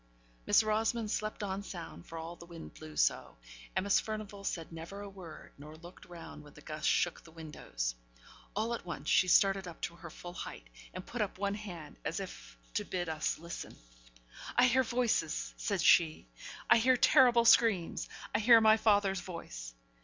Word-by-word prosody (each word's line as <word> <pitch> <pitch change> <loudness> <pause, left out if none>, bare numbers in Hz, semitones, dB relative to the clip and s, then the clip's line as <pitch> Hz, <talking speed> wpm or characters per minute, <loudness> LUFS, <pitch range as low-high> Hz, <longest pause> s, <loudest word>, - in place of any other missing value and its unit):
Miss - - +6
Rosamond 215 +1 0
slept 215 -1 -3
on 195 0 -3
sound, 175 -3 -9
for 165 - -8
all 165 +1 -6
the 170 - -13
wind 170 -1 -10
blew 155 -1 -11
so - - +1 0.4
Miss 200 +1 +3
Furnivall 215 -2 -6
said 165 -4 -4
never 165 +5 -8
a 205 - -7
word, 180 -6 -11
nor 150 +2 -10
looked 175 +2 -13
round 170 -3 -10
when 150 -1 -16
the 150 - -13
gusts 155 0 -4
shook 175 - +1
the 170 - -15
windows. 150 - -5 0.6
All 220 +3 0
at 235 - -4
once 165 -4 -5
she 185 - +4
started 195 +1 +4
up 170 - -9
to 170 - -4
her 170 - -9
full 175 +2 -9
height, 115 - -8 0.2
and 185 - -8
put 245 - -4
up 205 -3 -2
one 200 +1 -1
hand, 180 -7 -8
as 165 - -2
if 190 -2 -9 0.2
to 210 - 0
bid 180 -4 -3
us 155 -1 -1
to 160 - -16
listen. 170 - -7 0.8
'I 245 - +7
hear 260 +1 +4
voices!' 235 -9 0
said 200 -5 -1
she. 160 - +4 0.4
'I - - +9
hear 255 +2 +4
terrible 245 -3 +5
screams 220 -7 +4 0.2
I 210 - +2
hear 230 +1 +7
my 220 0 +6
father's 205 -4 +2
voice!' - - -8
185 Hz, 185 wpm, -32 LUFS, 165-215 Hz, 0.8 s, I